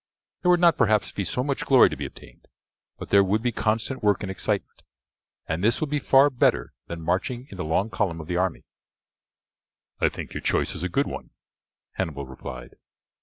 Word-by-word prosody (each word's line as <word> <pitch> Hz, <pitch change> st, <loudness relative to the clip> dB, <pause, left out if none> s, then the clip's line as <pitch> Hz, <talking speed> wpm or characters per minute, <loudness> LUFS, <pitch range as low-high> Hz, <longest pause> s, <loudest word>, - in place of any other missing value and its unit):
There 180 Hz, -, +2 dB
would 175 Hz, -1 st, +5 dB
not, 170 Hz, -2 st, +4 dB
perhaps, 110 Hz, -4 st, +2 dB
be 100 Hz, -, -3 dB
so 125 Hz, +6 st, -2 dB
much 140 Hz, 0 st, -2 dB
glory 130 Hz, -2 st, +6 dB
to -, -, -5 dB
be -, -, -4 dB
obtained, -, -, -16 dB, 0.5 s
but -, -, -8 dB
there 100 Hz, 0 st, +6 dB
would 105 Hz, +4 st, 0 dB
be 120 Hz, -, +1 dB
constant 115 Hz, +4 st, -1 dB
work 105 Hz, -2 st, +2 dB
and 95 Hz, -, -3 dB
excitement, 95 Hz, -, -3 dB, 0.7 s
and 80 Hz, +3 st, -2 dB
this 115 Hz, +2 st, +3 dB
will 155 Hz, -, -1 dB
be 145 Hz, 0 st, 0 dB
far 140 Hz, +1 st, +5 dB
better 125 Hz, -, +1 dB
than 85 Hz, -1 st, -6 dB
marching 95 Hz, +9 st, -1 dB
in 95 Hz, -, -9 dB
the 90 Hz, -, -3 dB
long 95 Hz, +8 st, 0 dB
column 90 Hz, -6 st, -1 dB
of 80 Hz, -, -7 dB
the 90 Hz, +2 st, -3 dB
army." 90 Hz, -1 st, -1 dB, 1.4 s
"I -, -, +3 dB
think -, -, -8 dB
your -, -, -4 dB
choice -, -, +1 dB
is -, -, -6 dB
a 90 Hz, -, -2 dB
good 140 Hz, +11 st, +1 dB
one," -, -, -7 dB, 0.7 s
Hannibal 75 Hz, -7 st, -3 dB
replied. 65 Hz, -2 st, -9 dB
105 Hz, 200 wpm, -25 LUFS, 90-125 Hz, 1.4 s, glory